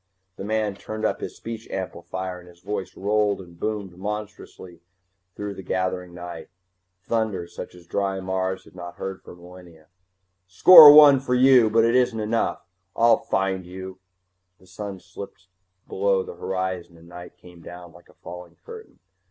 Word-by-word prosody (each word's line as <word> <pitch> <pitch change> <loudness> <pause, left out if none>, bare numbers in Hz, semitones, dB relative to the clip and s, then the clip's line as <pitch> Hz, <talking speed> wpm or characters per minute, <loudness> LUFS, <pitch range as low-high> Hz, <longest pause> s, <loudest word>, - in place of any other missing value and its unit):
The - - -8
man 110 0 -1
turned 110 +2 -6
up - - -1
his - - -6
speech 115 -1 -8
amplifier 95 0 -6
and 90 0 -16
his 85 0 -19
voice 100 0 -6
rolled 105 0 0
and 85 -2 -14
boomed 105 -4 -4
monstrously 105 -4 -8 0.5
through 105 0 -5
the 95 - -9
gathering 95 -1 -3
night, 85 -1 -9 0.5
thunder 110 -4 -2
such 85 - -10
as 90 -1 -16
dry 95 +2 -2
Mars 95 0 -3
had - - -19
not 85 -1 -9
heard 95 +1 -7
for - - -13
millennia: 90 -2 -16 0.6
"Score 150 - +10
one 145 -2 +8
for 125 -1 -1
you! 125 -3 +5
But 115 +1 +3
it 115 - +2
isn't 125 -3 +1
enough! 110 +2 -2 0.3
I'll 115 0 +4
find 95 -1 -2
you!" 95 +1 -10 0.6
The - - -22
sun 95 +1 -8
slipped 95 +1 -12 0.4
below 95 -1 0
the - - -9
horizon 90 -1 -5
and 85 +1 -18
night 90 0 -12
came 90 -1 -16
down 90 0 -11
like 85 +1 -19
a - - -22
falling 90 0 -12
curtain. 450 -1 -12
95 Hz, 165 wpm, -23 LUFS, 90-110 Hz, 0.6 s, Score